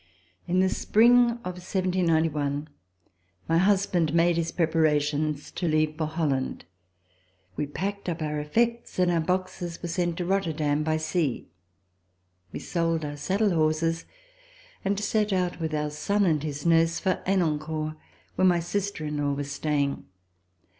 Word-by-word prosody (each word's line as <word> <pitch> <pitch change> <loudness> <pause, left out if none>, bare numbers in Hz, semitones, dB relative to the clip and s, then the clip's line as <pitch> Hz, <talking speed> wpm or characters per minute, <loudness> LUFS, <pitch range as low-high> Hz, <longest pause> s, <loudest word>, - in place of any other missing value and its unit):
In 180 +1 +2
the 190 - +3
spring 230 +6 +4 0.3
of 180 0 -5
1791 160 -6 0 0.8
my 165 - +3
husband 185 -4 +2
made 170 0 +4
his 165 0 -1
prep 165 -2 0
arations 150 -1 +1
to 175 - -2
leave 155 -1 +1
for 155 -1 -2
Holland. 150 -5 -2 0.9
We 145 - -2
packed 200 +6 -4
up 170 0 -3
our 150 -1 -2
effects, 235 +10 -1
and 180 -1 +3
our 170 - +2
boxes 180 0 -2
were - - -5
sent 175 0 -1
to 180 - -2
Rotterdam 160 -6 0
by 155 0 0
sea. 155 - -1 1.0
We - - -5
sold 165 -2 -1
our 145 0 -5
saddle 195 +8 +1
horses 165 +1 +1 0.8
and 200 +1 0
set 210 0 0
out 180 -2 0
with 160 -2 -2
our 150 0 -1
son 200 +7 +1
and 155 -5 +2
his 145 -1 -5
nurse 165 0 +3
for 190 -2 0
Henencourt 155 -4 0 0.4
where 185 - +3
my 175 -1 +4
sister 185 -1 -3
in 150 0 -3
law 145 -1 0
was 140 0 -4
staying. 140 -1 -1
165 Hz, 150 wpm, -26 LUFS, 150-185 Hz, 1.0 s, spring